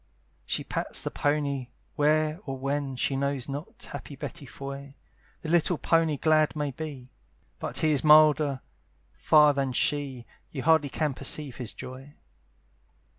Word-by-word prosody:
She - - -1
pats - - -2
the - - -3
pony, 145 -3 -1 0.3
where 155 +2 +2
or 135 0 -3
when 135 0 -2
She 135 +2 0
knows 140 -2 -1
not, 145 +3 -7
happy 145 - -7
Betty 145 +2 -7
Foy! 140 +1 -8 0.5
The 160 - -4
little 175 0 +3
pony 165 -2 +2
glad 155 +1 +3
may 145 -2 -2
be, 135 -3 -8 0.5
But - - -4
he 155 - +2
is 145 -3 +1
milder 150 -3 +5 0.5
far 145 - +5
than 135 -2 -1
she, 135 -2 0 0.2
You 135 -4 -5
hardly 160 -2 +4
can 150 0 -1
perceive 135 0 -2
his 125 -4 -5
joy. 130 +3 -10
145 Hz, 145 wpm, -27 LUFS, 135-155 Hz, 0.5 s, milder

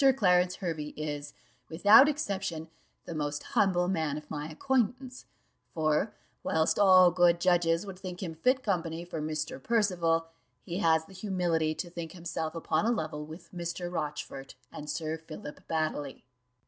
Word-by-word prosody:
Clarence 180 -4 +3
Hervey 160 -5 -4
is, 145 -1 -5 0.3
without 205 - +7
exception, 190 - -3 0.4
the - - -6
most 145 -1 -3
humble 180 -3 +2
man 160 -6 -1
of 150 - -10
my 150 0 -4
acquaintance; 255 - -1 0.5
for 155 +5 +1 0.3
whilst 160 0 +1
all 185 -3 +7
good 175 -1 +4
judges 170 0 +2
would 190 -2 -8
think 185 -1 -6
him 165 -3 -4
fit 255 +11 +1
company 170 -4 -2
for 165 -3 -5
Mr. 155 -2 -3
Percival, 175 - +1 0.4
he 175 +2 -4
has 160 -3 +3
the 195 - -15
humility 175 -5 0
to 175 +1 -5
think 170 -2 -6
himself 170 -2 -4
upon 165 +4 0
a - - +3
level 155 -8 -3
with 160 +3 -11
Mr. 175 0 -4
Rochfort 150 -4 -5 0.2
and 150 0 -8
Sir 160 0 -3
Philip 155 -2 -10
Baddely." 155 -3 -2
170 Hz, 150 wpm, -30 LUFS, 155-185 Hz, 0.5 s, without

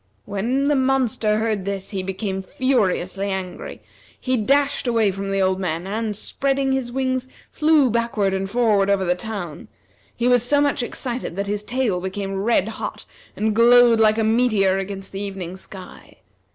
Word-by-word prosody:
When 245 +8 -1
the 295 - +3
monster 260 -5 +1
heard 215 -3 -1
this, 195 0 -4
he 195 -2 -2
became 190 +1 -3
furiously 195 -4 0
angry. 190 - -5 0.4
He 255 0 0
dashed 275 +4 +1
away 225 -4 +2
from 195 +1 -5
the 195 0 0
old 190 0 +1
men 170 -2 -2
and, 215 +2 -2
spreading 270 +5 -1
his 265 -2 -1
wings, 260 0 -1 0.2
flew 305 -3 +4
backward 230 -4 0
and 195 0 -2
forward 210 -3 +2
over 195 -1 +2
the 175 - +2
town. 180 -5 -6 0.5
He 245 - 0
was 245 -1 +4
so 285 +5 +2
much 285 -3 +1
excited 240 -5 -4
that 200 +1 -2
his 205 +1 -2
tail 225 -5 -1
became 195 +1 -4
red 215 -2 +2
hot, 220 - -6 0.3
and 215 0 0
glowed 235 0 +6
like 215 0 +4
a 225 - +1
meteor 215 -4 +2
against 195 0 -6
the 195 - -5
evening 190 -3 -5
sky. 190 -1 -12
215 Hz, 170 wpm, -22 LUFS, 195-245 Hz, 0.5 s, glowed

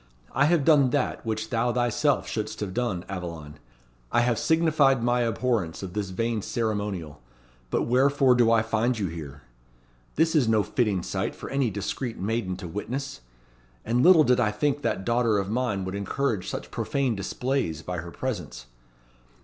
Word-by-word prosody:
"I 140 - +3
have 160 -2 +2
done 145 -5 +5
that 135 0 -1
which 110 +1 -3
thou 120 +1 +1
thyself 120 +4 +1
should'st 110 -1 -4
have 100 -3 -3
done, 110 -7 -2
Aveline. 85 -6 -7 0.5
I 120 - +3
have 120 -2 +1
signified 155 -6 +3
my 120 0 +2
abhorrence 115 -7 -1
of 90 -2 -6
this 105 -2 -2
vain 115 +3 -1
ceremonial. 100 - -3 0.5
But - - 0
wherefore 135 +2 +4
do 120 -2 +4
I 115 -1 +4
find 110 +2 0
you 105 - -1
here? 75 -4 -8 0.7
This 160 +1 +2
is 145 -7 +3
no 110 -2 +3
fitting 100 -4 0
sight - - -3
for - - -8
any 135 -3 +1
discreet 110 +4 -4
maiden 100 -2 -2
to 90 - -7
witness; 120 - -5 0.6
and 120 +2 +1
little 170 -1 +7
did 125 -3 +3
I 115 -4 +3
think 140 +7 -1
that 95 - -2
daughter 115 -2 +2
of 100 0 -2
mine 115 -6 -1
would 95 - -4
encourage 100 +1 -2
such - - -6
profane 135 -4 -1
displays 100 - -2
by 90 -1 -4
her 85 +1 -7
presence. 85 - -5
115 Hz, 170 wpm, -26 LUFS, 95-130 Hz, 0.7 s, little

